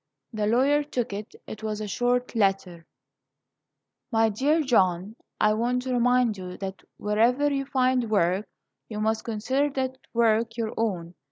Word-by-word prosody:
The 210 -1 -1
lawyer 270 +6 +3
took 250 -7 -3
it. 205 +2 -7
It 220 - -8
was 215 -1 -3
a 215 - -4
short 245 +4 0
letter: 195 -5 0 1.2
"MY 225 -1 +3
DEAR 285 +10 +2
JOHN: 195 - +1 0.2
I 215 0 +4
want 245 +3 0
to 255 -1 -2
remind 245 -3 +2
you 180 -1 -7
that 195 -1 -6 0.2
wherever 240 +8 +2
you 275 0 -1
find 255 -3 +1
work, 195 -1 +1 0.4
you 210 -2 -5
must 220 +1 0
consider 255 +6 0
that 260 -1 -2
work 230 0 +2
your 225 -2 -2
own. 180 -7 -2
225 Hz, 155 wpm, -26 LUFS, 210-250 Hz, 1.2 s, I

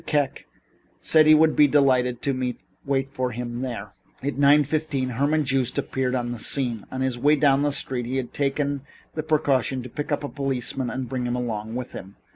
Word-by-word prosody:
Kek 145 -3 -1 0.5
said 155 -1 +4
he 155 - +8
would 155 0 +4
be 150 - +6
delighted 130 -4 +2
to 130 -3 -1 0.3
wait 135 -1 0
for 130 -2 -2
him 120 0 -5
there. 115 -6 -5 0.3
At 140 +1 -2
nine 145 +1 +5
fifteen 145 -3 -1
Herman 145 +5 +1
Joost 135 -2 0
appeared 130 -1 -1
on 120 -1 -2
the 120 - -5
scene. 120 -4 0
On 130 - -4
his 130 -2 -1
way 145 +4 +4
down 140 -1 +3
the 145 0 +1
street 125 -3 -2
he 130 +2 -2
had 130 -2 -4
taken 140 0 -1 0.3
the 155 - -2
precaution 140 -5 +1
to 125 - -8
pick 145 +5 -5
up 145 - 0
a - - -2
policeman 135 -2 -2
and 130 -1 -4
bring 125 0 -3
him 120 - -1
along 110 -2 -3
with 125 -1 -5
him. 95 +1 -9
130 Hz, 205 wpm, -24 LUFS, 125-145 Hz, 0.5 s, he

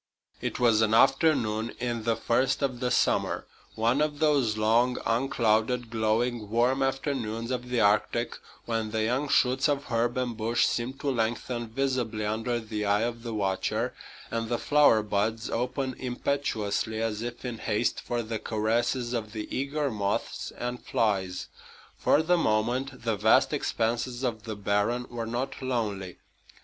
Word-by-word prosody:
It - - -3
was 115 -3 +4
an 110 0 +3
afternoon 120 -5 +3
in 120 -2 -2
the 115 -1 +2
first 130 +5 +1
of 130 -3 -1
the 125 -1 0
summer, 125 - +1 0.3
one 115 +6 +2
of 150 -1 0
those 140 -8 +2
long, 115 +4 +3
unclouded, 115 -1 +1
glowing, 110 0 0
warm 120 +4 +2
afternoons 130 -4 -1
of 125 -1 -3
the 125 -2 +1
Arctic, 105 +3 +2 0.3
when 115 -2 -1
the 110 0 -1
young 130 +6 0
shoots 130 +2 +3
of 140 -1 0
herb 120 +1 +1
and 125 -2 -1
bush 115 +2 +2
seem 120 +2 -1
to 135 +1 -2
lengthen 120 0 -1
visibly 120 -3 -1
under 115 +3 -1
the 110 -2 -4
eye 100 +1 +2
of 120 0 -3
the 115 -2 -5
watcher, 95 -2 -1 0.4
and 115 -1 -2
the 120 - +1
flower 145 -7 +4
buds 110 +2 -1
open 130 +2 -1
impetuously 120 -4 -1
as 110 -1 -1
if 120 +2 -6
in 120 -3 -4
haste 110 +2 0
for 120 -1 -2
the 110 0 -4
caresses 120 +3 0
of 110 -3 -3
the 110 -1 -5
eager 140 +1 -1
moths 100 -2 -2
and 120 0 -4
flies. 95 -4 0 0.5
For 155 - +3
the 175 +2 +3
moment 125 +2 0
the 115 -3 0
vast - - +4
expanses 120 +2 -1
of 115 -3 -2
the 110 -2 -4
barren 105 +4 0
were 115 -2 -4
not 125 +5 -3
lonely. 105 -8 -2
120 Hz, 160 wpm, -28 LUFS, 110-125 Hz, 0.5 s, was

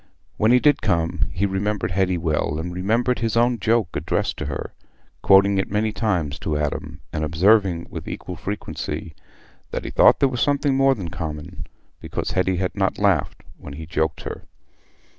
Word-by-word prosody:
When 110 +2 +3
he 125 - +6
did 145 +1 +3
come 85 -1 0
he 90 +4 0
remembered 100 +1 -1
Hetty 90 0 +1
well, 75 -2 -1
and 85 +3 -4
remembered 115 +7 0
his 115 -1 -1
own 120 0 +3
joke 110 -5 +2
addressed 75 - -1
to - - -4
her, - - -5 0.5
quoting 100 0 +5
it 95 - -1
many 110 +2 0
times 90 -11 -1
to 75 -2 -2
Adam, 75 +2 -3
and 75 -1 -2
observing 90 +2 +3
with - - -7
equal - - -6
frequency 80 - -5 0.6
that - - -4
he - - -4
thought - - +5
there 140 - +4
was 125 -2 -3
something 145 -1 +2
more 135 0 +4
than 95 -7 -5
common, 75 +1 -6 0.3
because - - -4
Hetty 95 0 +1
had 90 0 -1
not 95 -2 0
laughed 100 -8 +1 0.2
when 70 - -9
he 80 +3 -7
joked 80 -1 -1
her. - - -7
95 Hz, 180 wpm, -22 LUFS, 80-110 Hz, 0.6 s, he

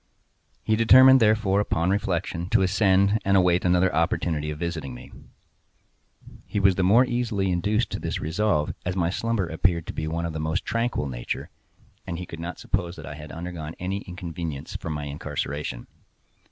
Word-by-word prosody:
He 110 - +2
determined, 130 +4 +7
therefore, 105 -3 +3
upon 90 -3 +1
reflection, 90 -3 -2
to 105 -2 +3
ascend, 100 +2 +3
and 100 0 +3
await 90 -1 +3
another 90 +1 +3
opportunity 80 -2 0
of 75 - -4
visiting 80 -6 -4
me. - - -12 1.4
He 105 - -1
was 100 -1 +5
the 95 - -1
more 110 +8 +5
easily 115 -6 -1
induced 105 +6 0
to - - -3
this - - -3
resolve, 80 -1 0
as 90 0 -2
my 85 -2 +1
slumber 115 -1 -1
appeared 85 0 0
to - - -6
be 80 - -3
of 85 +1 -3
the 80 - -4
most 80 +4 -2
tranquil 115 -9 -1
nature, - - -5 0.6
and 85 - -3
he 90 - -5
could 85 - -9
not 85 0 -5
suppose 90 -2 -2
that - - -9
I 75 - -7
had 75 0 -10
undergone 85 -2 -6
any 95 +2 -3
inconvenience 85 -5 -6
from 80 - -4
my 75 -1 -4
incarceration. 70 -2 -4
90 Hz, 175 wpm, -25 LUFS, 80-100 Hz, 1.4 s, determined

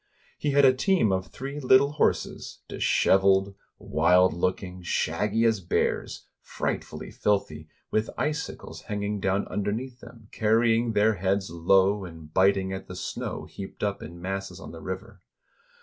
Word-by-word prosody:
He 150 - -1
had 140 0 +5
a 130 - +7
team 170 - +2
of 95 -1 -1
three 135 - -6
little 135 +1 +5
horses, 150 - -1
disheveled, 95 0 +3 0.2
wild 90 +4 +3
looking, 90 +1 -2
shaggy 105 +6 0
as 110 -2 +3
bears, 90 - -1 0.2
frightfully - - -4
filthy, 80 -7 -1 0.2
with 110 +1 0
icicles 150 0 -4
hanging 105 0 -2
down 95 +1 0
underneath 115 +5 -3
them, 115 -3 -14
car 110 0 +2
rying 115 0 +2
their 105 +1 +4
heads 95 0 0
low, 95 +4 +3
and 80 -3 -11
biting 95 0 +3
at 95 - -6
the 90 - -8
snow - - -5
heaped 95 +1 -9
up 100 -1 -1
in 85 +2 -9
masses 95 0 -5
on - - -9
the 80 - -10
river. 95 0 -7
100 Hz, 150 wpm, -26 LUFS, 95-110 Hz, 0.2 s, a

